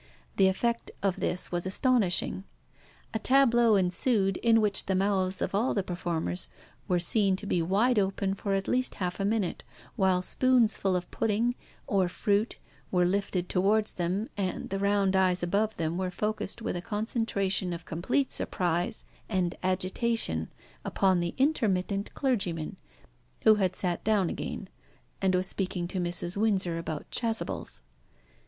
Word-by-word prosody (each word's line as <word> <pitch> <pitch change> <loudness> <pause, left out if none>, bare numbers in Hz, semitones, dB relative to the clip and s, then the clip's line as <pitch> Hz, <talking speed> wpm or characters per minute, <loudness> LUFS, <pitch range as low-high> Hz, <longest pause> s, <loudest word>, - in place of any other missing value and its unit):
The 195 - +6
effect 235 +5 0
of 195 -2 0
this 180 - -2
was 175 +1 -1
astonishing. 200 -4 +2 0.7
A 220 - -1
tableau 240 -3 +4
ensued, 195 +1 +2
in 230 -1 +4
which 210 -2 +2
the 190 - +1
mouths 190 -1 +1
of - - -3
all 215 +6 +1
the 200 - +1
performers 170 - -2 0.4
were 180 - +2
seen 195 +3 +3
to 200 - -6
be 180 -3 +1
wide 210 +7 +2
open 195 0 0
for 200 0 -2
at 195 0 -2
least 255 0 +1
half 180 0 -3
a 195 - 0
minute, 205 -3 -1 0.3
while 185 -2 +2
spoons 250 0 +3
full 190 -2 0
of 180 0 -3
pudding, 225 +2 +1 0.3
or 190 -3 +1
fruit, 205 +4 0 0.3
were 180 -1 +2
lifted 185 -1 -1
towards 210 +3 +1
them, 185 +5 -1
and 190 -3 -3
the 195 - -1
round 200 -1 +2
eyes 185 -2 +3
above 210 +5 0
them 165 +2 -2
were 185 -1 -1
focussed 210 +3 -3
with - - -2
a 175 - -3
concentration 205 -3 -1
of 170 0 -6
complete 245 - -1
surprise 175 +2 -1 0.2
and 185 -4 0
agitation 185 - 0 0.3
upon 190 -2 +2
the 170 0 -2
intermittent 205 -8 0
clergyman, 190 - -1 0.7
who 220 - +7
had 185 -1 +1
sat 180 -2 -1
down 205 -5 +2
again, - - -5 0.5
and 190 -1 +2
was 180 +1 +1
speaking 185 -2 -2
to 185 +1 -4
Mrs. 175 0 -2
Windsor 190 -6 +1
about 155 -3 -5
chasubles. 220 - -3
195 Hz, 155 wpm, -28 LUFS, 180-215 Hz, 0.7 s, who